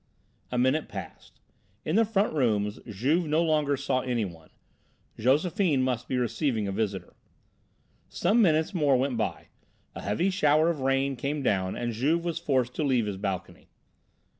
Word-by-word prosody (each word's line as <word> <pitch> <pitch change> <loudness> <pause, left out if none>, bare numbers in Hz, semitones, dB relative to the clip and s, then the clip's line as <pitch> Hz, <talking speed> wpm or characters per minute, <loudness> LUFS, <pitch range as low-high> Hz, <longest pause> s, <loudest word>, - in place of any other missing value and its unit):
A 125 - -1
minute 130 +5 +1
passed; - - -9 0.5
in 155 - 0
the 225 +1 +5
front 205 -3 0
rooms 105 -7 0
Juve 135 - 0
no 155 +3 +2
longer 150 -3 +1
saw 135 -1 0
anyone. 105 -11 -3 0.7
Josephine 150 - +2
must 125 -2 -2
be 130 - -1
receiving 120 -2 -1
a - - -2
visitor. 100 -1 -3 1.0
Some 210 +7 +2
minutes 160 -2 +2
more 145 -7 +3
went 130 0 0
by; 110 -3 -3 0.4
a - - -7
heavy 105 - 0
shower 155 -2 +3
of 160 - -5
rain 135 +1 +1
came 140 +3 -3
down 95 -5 0
and 120 -1 -3
Juve 155 +9 0
was 170 -1 -2
forced 130 -6 0
to - - 0
leave 130 -5 +2
his 100 -2 -4
balcony. 95 -3 -5
135 Hz, 160 wpm, -27 LUFS, 115-155 Hz, 1.0 s, the